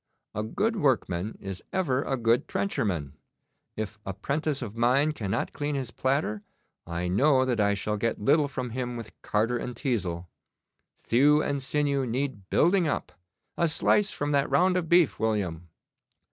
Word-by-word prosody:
A 105 - -2
good 210 - -1
workman 110 - 0
is 95 -2 -6
ever 140 -9 +1
a 135 -1 -1
good 115 0 +2
trencherman. 95 -7 -1 0.6
If 110 -1 -4
a 95 -2 -5
'prentice 140 +6 -1
of 110 -2 -7
mine 130 +6 +3
cannot 105 -10 -2
clean 145 0 -2
his 130 -4 -3
platter, 130 -5 0 0.5
I 85 +1 -2
know 130 +8 +3
that 125 -3 0
I 100 -1 +3
shall 105 +1 -2
get 115 +2 -1
little 145 +7 +3
from 130 -3 -4
him 125 0 -3
with 115 -2 -8
carder 115 +3 0
and 125 +1 -5
teazel. 95 - -2 0.7
Thew 145 +5 +3
and 140 -1 -1
sinew 140 -1 0
need 120 -5 -3
building 175 +1 +3
up. - - -2 0.5
A 170 - +3
slice 200 +5 +2
from 145 0 -2
that 140 -1 +2
round 185 +1 +3
of 175 -3 -1
beef, 170 -4 +4
William! 90 -7 -1
125 Hz, 160 wpm, -27 LUFS, 105-145 Hz, 0.7 s, beef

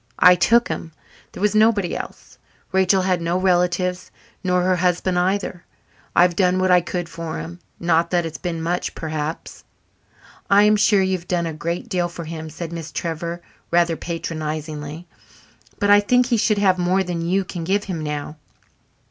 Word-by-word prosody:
I 180 +1 +8
took 230 +7 +3
him. 160 - -5 0.4
There - - -9
was 210 0 +2
nobody 215 -4 +3
else. - - -8 0.3
Rachel 190 0 +3
had 185 -2 +1
no 170 +2 0
relatives 180 0 +1 0.3
nor 180 -1 +1
her 185 0 +2
husband 180 0 +1
either. 185 -1 -1 0.5
I've 175 0 +4
done 180 0 +2
what 185 0 +2
I 180 0 +6
could 175 0 -4
for 165 -1 -6
him 175 +2 -7 0.2
not 170 0 +2
that 175 -2 +1
it's 160 - -6
been 165 -3 -4
much, 175 +2 -2
perhaps." 155 0 -5 0.9
"I 200 +1 +6
am 210 0 +5
sure 205 -1 +4
you 190 0 +1
have 170 - -19
done 175 -2 0
a 165 - -3
great 170 +9 -4
deal 180 -5 -1
for 170 -1 -8
him," 160 0 -6
said 165 +2 -7
Miss 165 -2 -6
Trevor 170 +2 -4 0.3
rather 170 -1 +2
patronizingly. 155 -1 -5 0.7
"But 205 0 +2
I 205 - +8
think 245 +5 +3
he 240 -1 +1
should 215 0 +2
have 190 -3 +3
more 185 +2 +2
than 175 -2 -3
you 185 +3 0
can 175 -2 -6
give 200 +4 0
him 180 -6 -4
now. 150 0 -4
175 Hz, 180 wpm, -21 LUFS, 165-190 Hz, 0.9 s, I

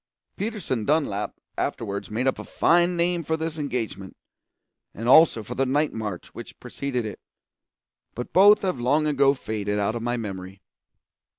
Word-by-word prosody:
Peterson 200 - -3
Dunlap 140 -8 0 0.2
afterwards 100 0 -3
made 115 +4 -2
up 130 - +1
a - - -5
fine 175 +1 +2
name 175 0 +1
for 160 0 -1
this 160 0 -4
engagement, 115 -9 -4 0.8
and 115 +3 -5
also 135 -4 +6
for 115 - -6
the 135 - 0
night 145 +4 +1
march 105 -5 -5
which - - -10
preceded 130 -4 -4
it, 105 -3 -6 1.0
but 125 - -6
both 205 +3 +7
have 185 -9 -1
long 145 +5 +2
ago 140 -2 +3
faded 105 -4 -3
out 105 +1 0
of 120 - -4
my 120 +1 -1
memory. 95 -3 -7
125 Hz, 160 wpm, -25 LUFS, 105-160 Hz, 1.0 s, both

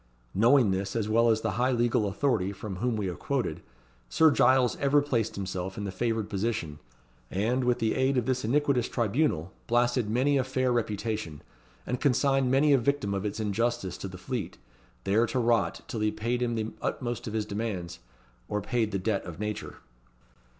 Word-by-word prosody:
Knowing 120 +1 +5
this 95 +2 -2
as 110 -3 0
well 115 +2 +3
as 110 -1 +2
the 110 - -1
high 130 +1 +3
legal 120 -3 +2
authority 100 -2 0
from 100 -1 -6
whom 120 +4 0
we 105 -2 -2
have 90 -4 -4
quoted, - - -2 0.5
Sir 160 - +5
Giles 130 -3 +4
ever 140 +1 +3
placed 125 -6 -1
himself 95 -1 -4
in 105 - -3
the 100 - -3
favoured 115 0 -1
position, 100 -7 -2 0.5
and, 115 +7 0
with 125 0 +2
the 110 -2 0
aid 130 0 +1
of 120 - +1
this 130 0 0
iniquitous 135 0 +1
tribunal, 115 - 0
blasted 120 -1 +2
many 135 +5 +2
a - - +2
fair 130 0 0
reputation, 110 -8 -2 0.4
and 125 0 -3
consigned 135 -1 +2
many 140 +3 +4
a 135 - +5
victim 120 -5 0
of 100 +1 -2
its 105 +1 -3
injustice 110 -1 -1
to - - -4
the 95 -1 -9
Fleet, 120 -1 -4 0.5
there 110 +4 +2
to - - -2
rot 115 -3 +1
till 115 - -4
he 105 0 +2
paid 120 +3 -2
him 120 -1 0
the 110 0 -2
utmost 120 -2 -3
of 110 - -5
his 110 -1 -1
demands, 100 -5 -4 0.5
or 105 - 0
paid 110 +1 0
the 100 - 0
debt 100 +1 -1
of 85 -1 -9
nature. 105 0 -4
115 Hz, 190 wpm, -28 LUFS, 100-125 Hz, 0.5 s, Knowing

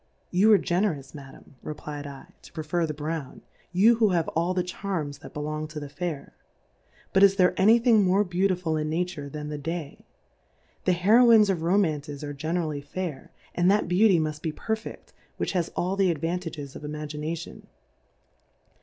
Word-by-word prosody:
You 200 +5 +4
are 210 - +8
Generous 175 -8 -1
Ma 140 -3 -10
dam, 135 - -18
reflyed 150 -1 -6
7, 140 -1 -9 0.2
to - - -15
prefer 160 +1 -1
the 155 - -3
Brown. 150 -2 -5 0.3
You 215 +6 +5
who 220 -2 +4
have 170 -3 +1
all 170 +3 0
the 180 - +1
Charms 175 -6 -4
that 160 - -12
be - - -3
long 155 +1 -3
to 155 0 -7
the 145 -1 -7
Fair: 155 0 -5 0.8
But, 190 - +4
is 200 -1 +7
there 180 -2 +4
any 220 +5 +6
Thing 230 -2 +4
more 190 +2 +3
Beautiful 180 -3 0
in 155 0 -2
Nature 160 -3 -3
tiian 150 +1 -6
the 150 -1 -5
Day? 160 0 -5 0.8
The 185 - +4
Heroines 215 +3 +6
of 175 -4 -2
Romances 155 -5 0
are 145 0 -5
generally 155 0 -2
fair, 155 0 -6 0.2
and 175 +1 +2
that 205 -1 +3
Beauty 185 +1 +4
mufl 155 -1 -2
be 160 - -2
perfefl:, 220 +7 -5 0.3
which - - -2
has 175 -3 -1
all 185 +2 -1
the 195 -2 +3
Advanta 165 +2 -3
ges 140 -3 -8
of - - -9
Imagination. 150 +2 -6
165 Hz, 180 wpm, -26 LUFS, 150-185 Hz, 0.8 s, are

